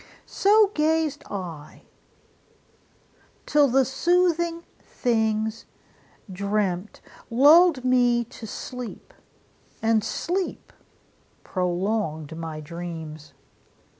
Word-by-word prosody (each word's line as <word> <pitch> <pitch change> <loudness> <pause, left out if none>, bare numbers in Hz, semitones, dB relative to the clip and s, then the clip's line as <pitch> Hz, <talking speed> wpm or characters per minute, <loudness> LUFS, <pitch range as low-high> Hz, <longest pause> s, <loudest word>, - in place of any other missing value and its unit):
So 415 0 +4
gazed 310 -1 0
I, 170 -7 -7 1.6
till 295 -1 +4
the 265 +1 +3
soothing 340 +3 +1 0.2
things, 220 -2 -1 0.6
I - - -11
dreamt, 200 0 -2 0.3
Lulled 290 +3 +6
me 245 -1 +3
to 230 -1 -11
sleep, 250 +2 -8 0.7
and 225 -1 +2
sleep 365 - -3 0.7
prolonged 180 -4 -2
my 160 -2 -6
dreams! 160 -2 -8
225 Hz, 75 wpm, -24 LUFS, 180-295 Hz, 1.6 s, Lulled